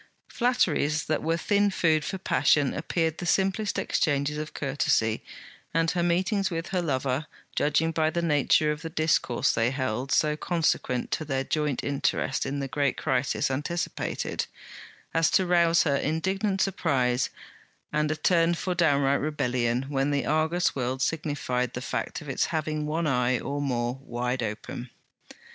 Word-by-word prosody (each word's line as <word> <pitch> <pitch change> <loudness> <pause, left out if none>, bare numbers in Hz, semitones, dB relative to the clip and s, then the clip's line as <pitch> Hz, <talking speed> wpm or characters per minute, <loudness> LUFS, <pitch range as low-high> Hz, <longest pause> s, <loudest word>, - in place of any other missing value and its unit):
Flatteries 160 - +1
that 155 - 0
were 165 +1 0
thin 205 +4 +2
food 160 -5 +2
for 190 - -3
passion 145 -6 +2
appeared 160 +1 -1
the - - -4
simplest 195 +3 +1
exchanges 145 -1 0
of 155 0 -5
courtesy, 135 -5 0 0.5
and 165 0 +3
her 175 - 0
meetings 185 +4 +1
with 165 -1 -4
her 185 -2 0
lover, 135 -2 -1 0.3
judging 150 +2 +2
by 160 -1 +1
the 170 +1 -2
nature 150 -1 +3
of 150 0 -4
the 165 - -5
discourse 155 -6 +1
they 115 +1 +2
held, 130 -1 -2
so, 150 -1 +3
consequent 155 -6 0
to - - -1
their 135 -3 -1
joint 150 -2 -1
interest 140 -1 0
in 140 +1 -2
the 135 - -2
great 140 -1 0
crisis 135 +1 0
anticipated, 150 +6 -2 0.7
as 165 -1 +3
to 190 - +3
rouse 170 -1 +4
her 140 -2 +2
indignant 190 +6 0
surprise 130 -10 +1 0.6
and 150 0 +1
a 155 - 0
turn 170 +1 +3
for 180 +2 -2
downright 140 -5 +2
rebellion 125 -4 0
when 140 0 0
the 140 -1 0
Argus 160 +3 +1
world 130 0 -1
signified 140 -5 -1
the - - -4
fact - - -3
of - - -11
its - - 0
having 155 -1 -2
one 160 +2 -1
eye, 125 -3 +2
or 145 +4 -3
more, 125 -2 -1
wide 125 0 -2
open. 110 +3 -5
150 Hz, 155 wpm, -27 LUFS, 135-165 Hz, 0.7 s, rouse